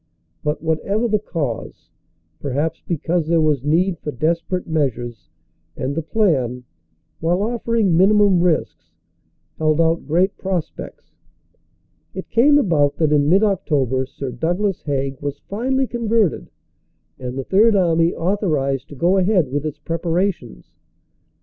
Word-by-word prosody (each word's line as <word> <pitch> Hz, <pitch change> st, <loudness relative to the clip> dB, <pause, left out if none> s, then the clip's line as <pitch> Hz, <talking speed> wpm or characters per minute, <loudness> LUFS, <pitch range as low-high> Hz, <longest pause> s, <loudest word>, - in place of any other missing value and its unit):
But 150 Hz, +2 st, -2 dB
whatever 195 Hz, +8 st, 0 dB
the 215 Hz, -2 st, +1 dB
cause 150 Hz, -, -5 dB, 0.5 s
perhaps 145 Hz, +4 st, -2 dB
because 170 Hz, 0 st, -1 dB
there 165 Hz, 0 st, +3 dB
was 150 Hz, -4 st, +1 dB
need 170 Hz, +4 st, +1 dB
for 150 Hz, -, -5 dB
desperate 165 Hz, +6 st, -1 dB
measures, 120 Hz, -, -2 dB, 0.5 s
and 130 Hz, +2 st, -2 dB
the 165 Hz, -, -2 dB
plan, 145 Hz, -, 0 dB, 0.6 s
while 175 Hz, +4 st, +1 dB
offering 230 Hz, -4 st, 0 dB
minimum 200 Hz, +1 st, +4 dB
risks, 175 Hz, -3 st, -1 dB, 0.6 s
held 155 Hz, 0 st, +2 dB
out 165 Hz, 0 st, +1 dB
great 180 Hz, +6 st, +2 dB
pros 185 Hz, -4 st, -2 dB
pects -, -, -10 dB, 1.0 s
it 190 Hz, -, -7 dB
came 285 Hz, +6 st, +5 dB
about 155 Hz, -, +2 dB
that 155 Hz, -2 st, +1 dB
in 145 Hz, 0 st, +3 dB
mid 195 Hz, +5 st, +4 dB
October 135 Hz, -, 0 dB
Sir 135 Hz, -1 st, -6 dB
Douglas 175 Hz, -, -1 dB
Haig 135 Hz, -2 st, -3 dB
was 145 Hz, 0 st, -4 dB
finally 265 Hz, +6 st, -1 dB
converted 230 Hz, -, 0 dB, 0.7 s
and 125 Hz, 0 st, -5 dB
the 135 Hz, -, -2 dB
Third 210 Hz, -, +4 dB
Army 165 Hz, -3 st, +3 dB
authorized 160 Hz, -8 st, -1 dB
to 145 Hz, -, -10 dB
go 175 Hz, +8 st, +2 dB
ahead 185 Hz, -7 st, +2 dB
with 145 Hz, +2 st, -1 dB
its 150 Hz, -, -6 dB
preparations. 165 Hz, -, -3 dB
165 Hz, 135 wpm, -20 LUFS, 145-195 Hz, 1.0 s, came